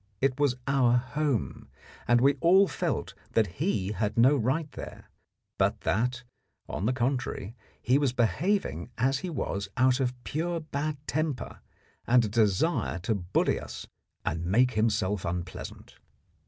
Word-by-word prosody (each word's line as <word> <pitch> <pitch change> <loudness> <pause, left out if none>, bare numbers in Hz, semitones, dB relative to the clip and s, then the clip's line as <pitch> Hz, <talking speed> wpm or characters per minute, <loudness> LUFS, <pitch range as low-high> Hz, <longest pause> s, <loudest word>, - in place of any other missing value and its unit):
It 135 0 +1
was 140 -4 +3
our 135 -3 +3
home, 135 -1 -2 0.4
and 120 0 +4
we 140 +2 +5
all 190 +4 +6
felt - - -2 0.2
that 105 -4 +1
he 105 - 0
had 105 +1 -2
no 130 +5 +6
right 135 +5 0
there, - - -9 0.5
but - - +1
that, 125 +9 0 0.4
on 100 - -2
the - - +3
contrary, 120 -4 -2 0.2
he 130 +4 +2
was 140 -4 +2
behaving 125 - 0
as 135 +3 +1
he 185 - -4
was 100 - -3
out 130 +1 +4
of 125 -1 0
pure 170 +3 -2
bad 150 -1 -3
temper 155 -3 -2 0.5
and 120 -1 +5
a - - -3
desire 110 - +1
to 110 - 0
bully 95 -3 0
us - - -8 0.4
and 80 +2 -1
make 120 +9 +3
himself 105 -4 0
unpleasant. 90 +1 -6
125 Hz, 145 wpm, -28 LUFS, 105-140 Hz, 0.5 s, all